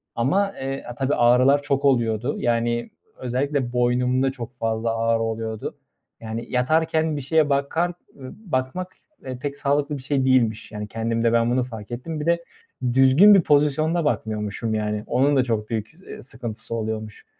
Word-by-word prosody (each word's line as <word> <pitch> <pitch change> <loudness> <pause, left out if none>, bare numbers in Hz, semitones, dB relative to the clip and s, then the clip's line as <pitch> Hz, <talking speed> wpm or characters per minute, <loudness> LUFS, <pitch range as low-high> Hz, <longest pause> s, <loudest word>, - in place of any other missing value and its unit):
Ama, 195 +12 +1
eee, 135 +1 -4
a 120 - -7
tabii, 135 +2 0
ağrılar 125 +4 +4
çok 140 0 -1
oluyordu. 120 -1 +1
Yani, 120 0 0 0.3
özellikle 130 0 -2
boynumda 125 +2 +2
çok 120 -2 -8
fazla 115 -1 -1
ağrı 115 0 +1
oluyordu. 110 -1 -3 0.5
Yani, 115 +1 -5
yatarken 160 +4 +1
bir 145 - -3
şeye 155 +2 +2
bakar, 140 +5 0 0.3
ııı, 130 -2 -9
bakmak, 160 +5 -3 0.3
eee, 130 -1 -5
pek 140 +2 -4
sağlıklı 145 +1 0
bir 130 - -10
şey 140 -2 0
değilmiş. 120 -5 +2
Yani, 105 -1 -5
kendimde 115 +1 0
ben 115 +1 +3
bunu 125 0 +2
fark 110 -2 -9
ettim. 150 +6 -5
Bir 150 - -4
de 170 0 +1 0.5
düzgün 135 +11 +7
bir 195 - +6
pozisyonda 150 +3 +2
bakmıyormuşum, 110 -3 -2
yani. 105 0 -2
Onun 140 +2 +2
da 130 - +4
çok 110 -3 -2
büyük, 110 -1 -3 0.2
ııı, - - -9
sıkıntısı 115 -2 -6
oluyormuş. 110 -1 -5
125 Hz, 160 wpm, -23 LUFS, 115-145 Hz, 0.5 s, düzgün